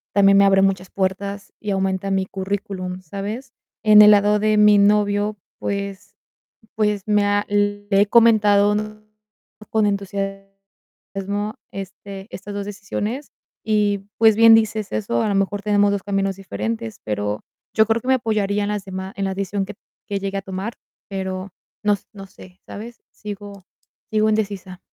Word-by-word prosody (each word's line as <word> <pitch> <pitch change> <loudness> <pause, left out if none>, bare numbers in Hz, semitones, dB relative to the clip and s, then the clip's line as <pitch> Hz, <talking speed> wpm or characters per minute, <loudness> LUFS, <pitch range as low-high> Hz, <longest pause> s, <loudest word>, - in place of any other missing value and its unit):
también 195 -1 +6
me 200 - +6
abre 195 -1 +5
muchas 190 -1 0
puertas 200 +1 -3
y 210 - -6
aumenta 190 0 -1
mi 190 -1 +1
currículum, 190 -1 -4
¿sabes? 205 +9 -6 0.3
En 210 -1 +8
el 210 - +9
lado 205 0 +4
de 215 0 +2
mi 210 0 +6
novio, 205 +1 +2 0.2
pues 200 -1 -4 0.6
pues, 210 -2 0
me 210 -1 +3
ha 205 0 +1
le 205 0 0
he 205 - +4
comentado 210 -2 +5 1.0
con 220 -1 +2
entusiasmo 195 +1 -5 0.2
este, 195 0 -8
estas 200 +1 -8
2 200 0 -4
decisiones, 205 +6 -4 0.3
y 205 -2 +1
pues, 220 -2 +5
bien 225 0 +8
dices 220 -2 +1
eso. 110 +2 0
A - - 0
lo 205 - 0
mejor 195 +1 0
tenemos 205 -1 +3
2 200 - -2
caminos 195 -1 -1
diferentes, 110 - -4
pero 105 0 -3 0.3
yo 220 0 +4
creo 225 +1 +1
que 255 - -7
me 265 - +5
apoyaría 210 -4 0
en - - -2
las 210 -2 -3
dema 190 0 -6
en 200 - -2
la 190 - -2
decisión, 195 +1 -2
que 205 - -8 0.3
que 200 - -1
llegue 195 0 -3
a - - -5
tomar, 195 +4 -5 0.4
pero 190 0 -4 0.3
no 210 -1 +3 0.2
no 195 -1 -9
sé, 185 -1 -16
¿sabes? 230 +3 -9
Sigo 205 -2 -9 0.5
sigo 215 0 +2
indecisa. 200 -4 -2
200 Hz, 160 wpm, -21 LUFS, 195-210 Hz, 1.0 s, el